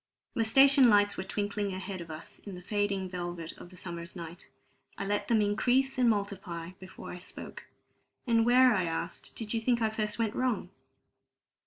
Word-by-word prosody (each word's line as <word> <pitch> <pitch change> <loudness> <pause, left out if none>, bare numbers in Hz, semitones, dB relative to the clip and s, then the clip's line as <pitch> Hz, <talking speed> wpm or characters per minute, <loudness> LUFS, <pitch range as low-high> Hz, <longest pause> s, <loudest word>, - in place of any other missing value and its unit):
The 230 - +1
station 270 +3 +6
lights 205 -1 +4
were - - -3
twinkling 205 0 -2
ahead 185 0 -5
of 165 - -9
us 155 0 -8
in 200 -3 -9
the 180 - -9
fading 200 -1 -1
velvet 175 -2 -5
of - - -11
the 180 - -14
summer's 170 0 -6
night. 170 -1 -9 0.5
I 195 - -3
let 205 +1 -1
them 220 -3 +3
increase 250 +6 +2
and 245 -2 +5
multiply 195 -5 -2
before 185 0 -9
I 180 - -7
spoke. 180 - -8 0.6
"And 230 -2 +3
where," 250 +1 +6
I 185 -4 +1
asked, 165 0 -4
"did 220 -1 -4
you 225 - 0
think 240 +1 +2
I 220 -1 +1
first 215 -1 -2
went 225 -2 0
wrong?" 255 -3 -1
205 Hz, 185 wpm, -30 LUFS, 180-225 Hz, 0.6 s, station